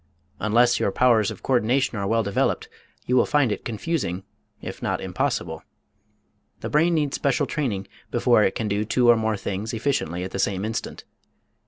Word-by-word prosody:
Unless 120 +3 +3
your - - +1
powers 110 -2 +3
of - - -9
coördination 125 +1 +2
are 100 -3 -2
well 115 +2 +2
developed 100 -1 0 0.4
you 125 - +1
will 125 - +4
find 145 -6 +2
it - - -3
confusing, 110 - -2 0.4
if - - -8
not - - -1
impossible. - - -2 1.0
The - - -4
brain 165 +3 +3
needs 150 -3 0
special 140 -2 +1
training 105 -10 -2 0.2
before 120 -2 +3
it 95 - +2
can 110 - -2
do 105 +1 0
two 120 +3 +2
or - - +5
more 110 -1 0
things 100 +3 -4
efficiently 110 - -1
at 95 - -5
the 95 - -4
same 95 0 0
instant. 110 +1 -4
115 Hz, 175 wpm, -24 LUFS, 100-125 Hz, 1.0 s, or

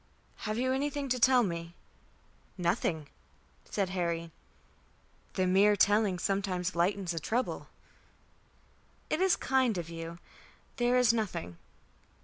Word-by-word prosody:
Have 215 - -1
you 255 +2 +1
anything 285 +1 -2
to 250 0 +1
tell 250 0 +5
me?" 170 -3 -4 0.8
"Nothing," 170 -3 0 0.6
said 195 -3 -1
Harry. 170 -2 -2 1.0
"The 185 - +2
mere 195 +3 +5
telling 205 -2 +3
sometimes 185 -1 -1
lightens 180 +1 +1
a 165 - -2
trouble." 235 +11 -2 1.4
"It 310 - +1
is 380 -1 +4
kind 260 -5 +1
of 170 -1 -5
you. 165 0 -6 0.6
There 245 +1 +3
is 245 -2 +5
nothing." 185 - -3
195 Hz, 120 wpm, -31 LUFS, 170-245 Hz, 1.4 s, tell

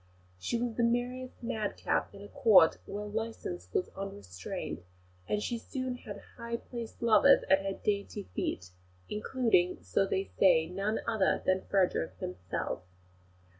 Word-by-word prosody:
She 235 - -1
was 240 -1 -1
the 240 - +3
merriest 245 +2 -1
madcap 215 -3 -1
in 200 - -10
a - - -8
Court 200 -7 +6
where 205 +1 -4
licence 210 - -4
was 180 - 0
unrestrained; 95 - -6 0.5
and 210 0 0
she 235 -1 -2
soon 255 +1 -3
had 200 -4 -9 0.2
high 235 0 -3
placed 235 -1 -8
lovers 220 -3 +6
at 190 0 +5
her 195 0 -1
dainty 200 0 -2
feet, 90 0 -3 0.4
including, 210 -5 +1
so 100 - +1
they 190 - 0 0.2
say, 170 -4 +6
none 195 +5 -1
other 220 -4 +2
than 185 0 +1
Frederick 185 -4 +2
himself. 90 0 -4
205 Hz, 140 wpm, -31 LUFS, 185-235 Hz, 0.5 s, Court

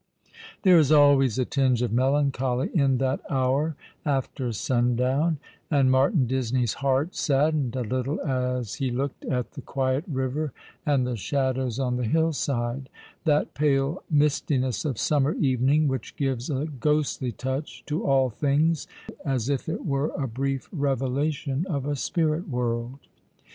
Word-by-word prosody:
There 180 -4 +7
is 150 -2 +3
always 140 -5 +5
a 130 - +1
tinge 130 -3 +1
of 120 - -1
melancholy 135 0 +1
in 140 -6 +3
that 130 +1 0
hour 135 +4 +1 0.3
after 135 -3 -1
sundown; 125 - +1 0.3
and 135 -4 +3
Martin 135 - +3
Disney's 125 -2 0
heart 140 +5 +1
saddened 145 -3 +1
a 130 - -1
little 130 +5 -2
as 125 -4 -1
he 130 - +1
looked 135 +3 -3
at 125 -3 -2
the 140 - -8
quiet 130 +2 -1
river, 135 0 -2 0.3
and 140 -4 +3
the 125 -1 -2
shadows 130 +1 -1
on 125 -2 0
the 125 - -1
hillside 135 -3 0 0.2
— - - -28
that 150 -2 +2
pale 140 +2 +1
mistiness 145 - +1
of 135 -7 -1
summer 145 +3 +2
evening 135 +2 +2
which 130 -1 -3
gives 135 -2 -2
a 140 0 -1
ghostly 150 -2 0
touch 130 +5 -5
to 150 +2 -2
all 135 -2 +3
things, 150 +6 +1 0.4
as 130 -3 -1
if 140 +1 -1
it 160 - -4
were 140 -1 0
a 135 - -1
brief 135 +3 -2
revelation 140 0 -1
of 140 -5 -2
a 145 0 -1
spirit 160 +4 -1
world. 120 0 -2
135 Hz, 150 wpm, -26 LUFS, 125-145 Hz, 0.4 s, There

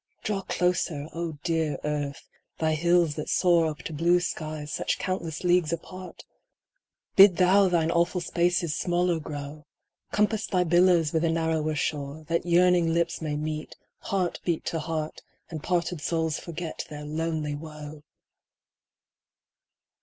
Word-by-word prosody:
Draw 205 -2 -1
closer, 170 -4 0
O 170 -1 -3
dear 160 -3 0
Earth, 145 -2 -3 0.3
thy 160 -1 +1
hills 170 0 +3
that 150 0 -5
soar 170 -3 +4
Up 150 -2 -5
to 165 - -5
blue 170 +4 +3
skies 155 -3 -4
such - - -1
countless 170 -4 -3
leagues 175 -3 +3
apart! 185 +2 -7 0.9
Bid 195 -3 +8
thou 190 +2 +5
thine 165 -2 +2
awful 170 +2 +1
spaces 175 -1 0
smaller 175 -1 +1
grow! 150 0 -7 0.4
Compass 210 +1 +1
thy 180 -2 +2
billows 175 -2 +4
with 160 0 +1
a 165 - +2
narrower 160 -1 0
shore, 145 +1 -3
That 170 +1 0
yearning 175 -1 +4
lips 170 0 0
may 150 -2 -2
meet, 155 +1 -4 0.2
heart 185 -3 -1
beat 170 -3 -1
to 165 - -2
heart, 155 -1 -4 0.3
And 155 -3 -5
parted 175 -2 -1
souls 160 0 -1
forget 170 -1 -5
their 150 0 -7
lonely 155 -1 -2
woe 150 0 -8
165 Hz, 140 wpm, -27 LUFS, 155-175 Hz, 0.9 s, Bid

